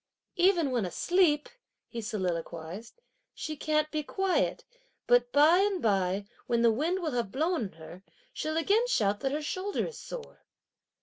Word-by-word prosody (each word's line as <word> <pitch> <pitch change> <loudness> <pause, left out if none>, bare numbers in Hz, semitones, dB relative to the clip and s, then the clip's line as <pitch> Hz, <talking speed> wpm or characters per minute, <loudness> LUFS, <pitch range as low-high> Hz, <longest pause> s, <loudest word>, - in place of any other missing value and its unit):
"Even 350 -5 +3
when 240 -4 +1
asleep," 300 - +2 0.4
he 235 - -6
soliloquised, 185 - -4 0.4
"she 310 - -4
can't 305 +1 0
be 310 - -1
quiet! 385 +5 0 0.4
but 245 0 +3
by 305 +5 +6
and 395 -1 +2
by, 195 - +1 0.2
when 235 -1 +2
the 230 - +6
wind 335 +10 -1
will 315 - -1
have 235 -6 -2
blown 315 - 0
on 190 - -7
her, 165 +3 -12 0.3
she'll 310 +1 -2
again 420 +8 +2
shout 205 - +1
that 270 - -1
her 300 +2 -2
shoulder 375 +6 -2
is 480 - -7
sore!" - - -9
290 Hz, 160 wpm, -29 LUFS, 215-350 Hz, 0.4 s, by